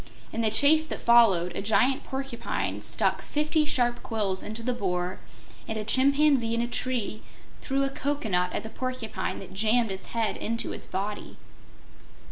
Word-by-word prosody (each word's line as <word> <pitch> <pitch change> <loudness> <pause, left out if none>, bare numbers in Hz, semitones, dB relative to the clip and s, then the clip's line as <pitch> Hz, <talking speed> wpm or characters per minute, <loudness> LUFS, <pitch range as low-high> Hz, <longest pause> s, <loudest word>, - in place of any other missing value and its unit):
In 230 - -1
the 220 - +2
chase 285 +8 +5
that - - -5
followed 195 -8 +4
a - - -2
giant 250 +6 +2
porcupine 235 - -4
stuck 190 - 0
fifty 305 +1 0
sharp 245 -5 +1
quills 205 -5 -1
into 220 +2 -4
the 250 - 0
Boar 180 -4 -2 0.5
and 220 - -3
a 215 - -2
chimpanzee 270 -1 +4
in 230 - 0
a - - -2
tree 240 -3 -2 0.4
threw 275 +1 0
a 275 - +1
cocoanut 220 -12 -1
at - - -3
the 220 - -8
porcupine 255 -3 -4
that 190 - -10
jammed 220 +2 +2
its 190 0 -7
head 225 -2 -1
into 230 +1 -3
its - - -9
body. 205 +2 -5
230 Hz, 165 wpm, -27 LUFS, 200-260 Hz, 0.5 s, chase